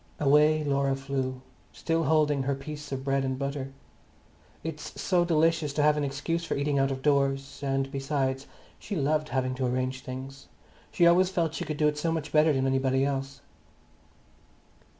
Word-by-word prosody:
Away 150 +2 +4
Laura 140 -1 +1
flew, 135 -1 -3 0.3
still 165 0 -1
holding 150 -3 +2
her 135 +1 -1
piece 150 +1 -8
of 135 -1 -3
bread 135 0 +1
and 130 -1 -2
butter. 140 0 -4 0.9
It's 155 -1 -6
so 180 -2 +2
delicious 160 -3 +2
to 150 - +1
have 150 0 +5
an 150 - -1
excuse 145 +5 -2
for - - -2
eating 140 0 0
out 135 0 +2
of 135 -1 -4
doors, 140 -1 +1
and 135 -1 -1
besides, 135 -1 -2 0.3
she 205 - -5
loved 155 0 0
having 130 -1 -1
to 130 0 -1
arrange 130 +1 -2
things; 135 +1 -8 0.4
she 170 - +3
always 180 +2 +5
felt 170 -4 -1
she 175 - -4
could 155 -1 -4
do 150 - +3
it 150 0 -1
so 165 +2 0
much 160 -2 -3
better 155 +1 +4
than 135 -2 +1
anybody 135 0 +1
else. 135 0 -3
140 Hz, 175 wpm, -28 LUFS, 135-155 Hz, 0.9 s, have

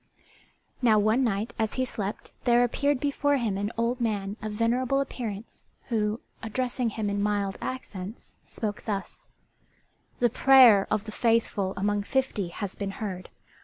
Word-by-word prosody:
] - - -35 0.3
Now 225 -4 +5
one 215 +5 +3
night 220 0 -1
as 220 -1 0
he 260 - +1
slept 205 -4 -4
there 240 -1 +5
appeared 280 +3 +1
before 285 +1 +1
him 225 -6 -1
an 205 +2 -2
old 235 +2 0
man 205 -3 -1
of 215 -1 -4
venerable 240 +5 +1
appearance 230 -6 -5 0.3
who, 215 -1 0 0.2
addressing 245 +1 -1
him 215 -1 -3
in 200 0 -1
mild 205 -2 -1
accents, 215 -5 -7
spoke 210 -2 -5
thus: 200 -3 -5 0.9
"The 240 -2 +2
prayer 245 -7 +7
of 215 -1 0
the 220 - -7
faithful 225 -4 +1
among 205 +1 +1
fifty 230 -4 -1
has 190 +3 -5
been 200 -1 -3
heard. 190 -4 -5
220 Hz, 155 wpm, -27 LUFS, 205-245 Hz, 0.9 s, prayer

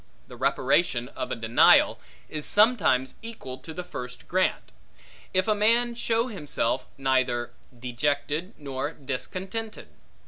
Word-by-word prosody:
The - - -11
reparation 125 -8 +1
of - - -5
a - - 0
denial, 115 +1 +5 0.3
is 155 -1 -5
sometimes 205 - +3
equal 220 - -8
to 160 - -10
the 180 +3 -5
first 125 -7 -8
grant; 185 +1 0 0.6
if 185 +3 +1
a 215 - +4
man 230 +3 +3
show 230 0 +1
himself 150 - -2
neither 130 -3 +1 0.3
dejected 145 +7 -2
nor 140 +1 -4
discontented. 185 - -5
150 Hz, 125 wpm, -26 LUFS, 130-210 Hz, 0.6 s, denial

